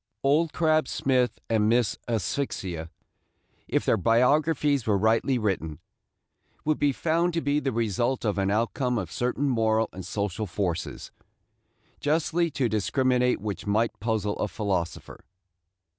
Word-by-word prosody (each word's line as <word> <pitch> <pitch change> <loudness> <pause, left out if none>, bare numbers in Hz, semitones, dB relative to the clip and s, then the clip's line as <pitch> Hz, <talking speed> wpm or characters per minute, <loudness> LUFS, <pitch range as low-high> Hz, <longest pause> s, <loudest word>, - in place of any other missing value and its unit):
Old 150 +4 +3
Crab 155 -3 +2
Smith 130 -2 +1
and 110 -2 +2
Miss 120 -3 +2
Asphyxia, 95 - -2 0.8
if - - 0
their - - +3
biographies 140 - +2
were 105 -2 +3
rightly 115 +5 +2
written, 95 -9 -2 0.9
would 155 0 +1
be 145 - +3
found 170 +4 0
to 165 - +1
be 145 0 +1
the 135 -2 -1
result 115 +3 -1
and 100 -2 0
out 110 +3 +1
come 125 -3 0
of 90 -6 -4
certain 125 +3 -1
moral 110 -3 +2
and 95 - -7
social 100 +2 -3
forces, 90 -2 -3 0.9
justly 165 +3 +1
to 135 -4 0
discriminate 125 +3 +1
which 105 -1 -5
might 110 +3 +1
puzzle 105 -2 -1
a - - 0
philosopher. 95 -2 -3
115 Hz, 135 wpm, -26 LUFS, 105-140 Hz, 0.9 s, Old